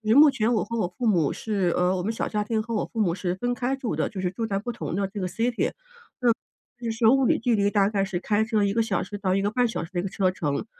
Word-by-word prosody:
目 295 +2 +9
前 235 -3 +1
我 220 - +1
和 230 +2 -4
我 210 - +1
父 245 - 0
母 170 -8 +2
是， 195 -6 -1
呃， 180 +1 +2
我 180 - -2
们 220 +4 -1
小 - - -2
家 210 -1 -1
庭 220 +1 -1
和 230 +1 -4
我 210 - 0
父 230 - -3
母 175 -5 +1
是 180 -2 -2
分 245 +6 -1
开 250 +2 -1
住 265 -4 -3
的， - - 0
就 195 -4 -6
是 180 - 0
住 210 +5 -3
在 200 -3 -1
不 240 +4 -4
同 235 - -5
的 195 0 0
这 200 +2 -7
个 185 - -1
city。 230 +5 0 1.1
那 235 -2 -2
是 225 +1 -1
物 270 +3 +5
理 - - +3
距 235 0 +2
离 200 -1 +2
大 200 -2 +3
概 200 -2 0
是 190 -2 -3
开 210 +3 +1
车 220 -2 +1
1 200 0 +1
个 230 - +2
小 195 -5 -1
时 205 +2 -6
到 190 -2 0
1 195 - +1
个 205 +1 0
半 245 +2 +2
小 225 - -3
时 165 - -10
的 180 +1 -1
车 185 -1 +1
程。 150 -2 -2
210 Hz, 320 characters per minute, -25 LUFS, 190-230 Hz, 1.1 s, 目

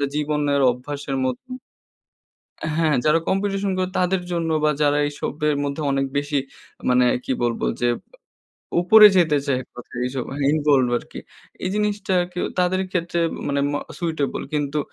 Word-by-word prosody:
জীবনের 150 -1 0
অভ্যাসের 135 +2 -5
মতো" 130 -1 -2 1.4
হ্যাঁ, 160 -3 +2
যারা 155 +2 +4
কম্পিটিশন 195 0 0
করে 185 0 0
তাদের 180 0 +1
জন্য 165 -1 -1
বা 150 - +4
যারা 145 0 +3
এইসবের 150 +1 -2
মধ্যে 140 +2 -3
অনেক 135 0 +1
বেশি, 145 0 -1 0.5
মানে 125 0 +4 0.2
কি - - -1
বলবো? 120 -1 0
যে, 120 - +2 0.9
উপরে 210 +4 +8
যেতে 160 -5 +4
চায় 135 -3 +1
এক - - -21
কথায়, 125 0 -8
এইসবে 130 0 -4 0.2
ইনভলভড 145 -5 +2
আরকি। - - -10 0.4
এই - - 0
জিনিসটা 210 -2 -1
আরকি 180 0 -7 0.2
তাদের 180 +1 +2
ক্ষেত্রে 175 -1 -1 0.3
মানে 140 0 0
ম - - -2 0.2
সুইটেবল। 160 -5 -2
কিন্তু 145 0 -1
150 Hz, 145 wpm, -22 LUFS, 140-180 Hz, 1.4 s, উপরে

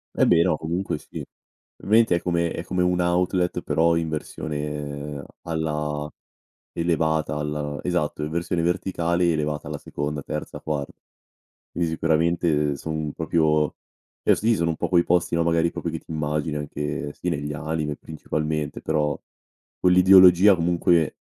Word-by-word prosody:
Eh - - +3
beh 85 - +5
no, 85 -4 +1
comunque 85 +1 -2
sì. - - -8 0.6
20 110 -1 +4
è 85 - -1
come 85 -1 0
è - - -4
come 90 -1 0
un 90 0 +1
outlet 90 +1 +1
però 85 +1 +2
in 80 -1 -1
versione 75 -2 -5 0.2
alla 75 -2 -2 0.6
elevata 80 -3 0
al 75 -1 -3
esatto, 80 -4 -1
in 75 - -3
versione 85 0 -1
verticali 85 -1 +1
elevata 75 -1 -2
alla - - -5
seconda, 75 0 -4
terza, 75 +1 -5
quar 75 -3 -2 0.9
Quindi 85 -1 -1
sicuramente 80 -2 +1
son 80 0 -4
proprio 80 -2 +1 0.5
cioè - - +5
sì, 110 0 +1
sono 85 0 0
un 80 - -2
po' - - -2
quei 85 -2 +4
posti, 85 -1 +1
no, 85 - +2
magari 85 0 +2
proprio 85 - -4
che 80 - -4
ti - - -20
immagini 75 0 -2
anche, 75 0 -4
sì, 90 - -5
negli 75 -3 -2
anime 75 0 -3
principalmente, 75 -1 -3
però 75 -1 0 0.6
quell'ideologia 90 +1 +7
comunque 85 -2 +2
80 Hz, 145 wpm, -24 LUFS, 75-85 Hz, 0.9 s, quell'ideologia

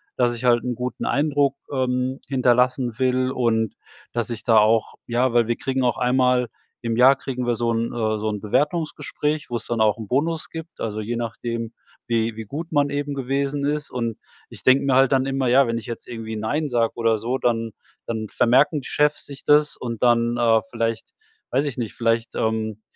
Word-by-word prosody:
dass 120 -1 +2
ich 120 - -7
halt 120 -1 +4
'n 125 -1 -2
guten 125 +2 -4
Eindruck, 145 -1 +1 0.2
ähm, 130 0 -1
hinterlassen 125 -2 +2
will 130 0 +1
und, 115 -4 0 0.4
dass 120 -1 -1
ich 115 -2 -5
da 115 -3 +4
auch 110 +1 +2
ja, 120 +1 +1
weil 120 -2 +3
wir 120 - 0
kriegen 130 -1 -1
auch 120 -2 +1
einmal 125 0 +2 0.3
im 115 -2 -1
Jahr 130 +3 +7
kriegen 125 -2 -4
wir 120 -1 +1
so 115 +1 0
'n 115 +1 -1
äh, 110 -2 0
so 110 +1 -1
'n 105 -1 -3
Bewertungsgespräch, 150 +4 -1
wo 120 - -1
es 115 - -9
dann 115 -2 -1
auch 110 +1 +3
'n 110 -2 -7
Bonus 155 +7 0
gibt, 165 +1 -9
also 110 -1 -3
je 115 +3 -3
nachdem, 115 0 -4 0.3
wie 115 -1 0
wie 110 0 -7
gut 155 +10 -6
man 145 -2 +2
eben 145 0 -2
gewesen 140 +1 -1
ist. 150 +1 -2
Und 115 -3 -3 0.3
ich - - -12
denk 130 +1 +5
mir 135 -2 +2
halt 135 -1 +5
dann 135 -1 +3
immer: 135 -1 -1
„Ja, 130 +2 +5
wenn 115 0 -1
ich 115 - -6
jetzt 120 -2 -7
irgendwie 115 -2 -6
‚Nein‘ 145 +9 -1
sag 115 -2 +1
oder 115 -1 +2
so, 120 +4 -1
dann 115 -3 0 0.4
dann 110 -2 -3
vermerken 140 +5 +3
die - - -9
Chefs 150 0 +1
sich 140 -1 -9
das 150 0 +4
und 115 -3 -5
dann, 120 -1 +3
äh, 115 -2 +4
vielleicht 115 -1 -2 0.4
weiß 135 +4 +1
ich 140 -4 -4
nicht, 115 -4 -3
vielleicht, 115 0 0
ähm, 110 -1 -1
120 Hz, 205 wpm, -23 LUFS, 115-135 Hz, 0.4 s, Jahr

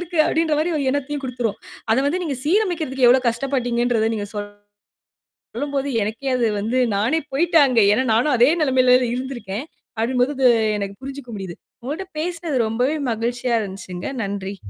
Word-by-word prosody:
இருக்கு." 350 -1 -5
அப்படீன்ற 320 -1 +1
மாரி 330 +3 0
ஒரு 285 - -1
எண்ணத்தையும் 285 +1 -3
குடுத்துரும். 245 -4 -3 0.3
அத - - +3
வந்து 340 +6 0
நீங்க 290 -5 -2
சீரமைக்கிறதுக்கு 320 - +1
எவ்வளவு 250 0 +4
கஷ்டப்பட்டீங்கன்றத 240 -2 0
நீங்க 205 -1 -3 1.1
சொல்லும் 285 0 -7
போது, 275 +1 -1
எனக்கே 225 +6 -3
அது 235 - +2
வந்து 225 +5 0 0.2
நானே 235 +11 +1
போயிட்டேன் 325 +1 +4
அங்க. 245 -3 +3
ஏன்னா 260 +5 +1
நானும் 250 +6 +2
அதே 245 +3 +6
நெலைமையில 255 -3 +4 0.2
இருந்திருக்கேன். 250 -3 -5 0.3
அப்படிங்கும் 245 +3 +1
பொழுது 270 -1 +1 0.3
எனக்கு 200 -1 -4
புரிஞ்சுக்க 275 -2 -8
முடியுது. 190 -3 -6 0.3
உங்களோட 300 +9 -4 0.2
பேசுனது 335 -3 -2
ரொம்பவே 250 +7 0
மகிழ்ச்சியா 240 +2 -1
இருந்துச்சுங்க. 190 -2 -7 0.2
நன்றி. 200 0 -4
255 Hz, 150 wpm, -21 LUFS, 225-290 Hz, 1.1 s, அதே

